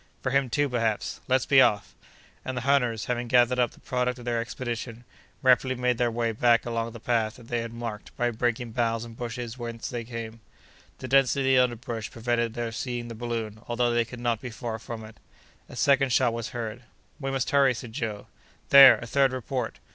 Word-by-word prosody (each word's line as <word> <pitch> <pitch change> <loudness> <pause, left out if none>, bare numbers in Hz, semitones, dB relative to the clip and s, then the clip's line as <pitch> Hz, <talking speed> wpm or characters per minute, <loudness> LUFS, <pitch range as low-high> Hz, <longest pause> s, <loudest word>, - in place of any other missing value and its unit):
"For 130 - -1
him, 135 -1 +2
too, 145 +4 +1
perhaps." 115 -4 -2
"Let's 130 0 +2
be 135 -2 +6
off!" 105 -5 +2 0.5
And 130 -1 -4
the - - -1
hunters, 125 -5 +1
having 120 -1 -2
gathered 125 +1 +3
up 120 -2 +3
the - - -20
product 125 0 -1
of 120 - -11
their 120 -1 0
expedition, 120 -1 -5 0.4
rapidly 130 0 +4
made 125 -1 0
their 120 -1 +2
way 115 0 -1
back 115 +1 +3
along 115 -1 -2
the 115 - -9
path 115 -1 0
that 120 -2 -15
they 120 - 0
had 115 0 -6
marked 115 -2 -7
by 120 0 +1
breaking 120 +1 -1
boughs 115 -1 -1
and 115 -1 -11
bushes 120 0 -6
when 115 -1 -5
they 120 -2 -4
came. 115 -1 -7 0.6
The 130 - -7
density 135 0 +3
of - - +6
the 120 - -7
underbrush 115 -1 -6
prevented 120 -1 -1
their 120 -1 -3
seeing 120 0 -4
the - - -6
balloon, 115 -2 -4
although 120 0 +1
they 120 0 +3
could 120 +2 -10
not 120 -2 -1
be 125 - -6
far 115 -1 -5
from 110 0 -7
it. 110 - -14 0.5
A - - -10
second 135 -1 +3
shot 125 -1 +3
was 115 0 -4
heard. 115 -1 -5 0.4
"We 135 -2 -3
must 135 -1 -1
hurry!" 140 -3 +4
said 115 -1 -8
Joe. 110 -3 -4 0.4
"There! 140 -1 +10
a - - -8
third 135 +2 +2
report!" 130 -4 -4
120 Hz, 210 wpm, -26 LUFS, 115-125 Hz, 0.6 s, There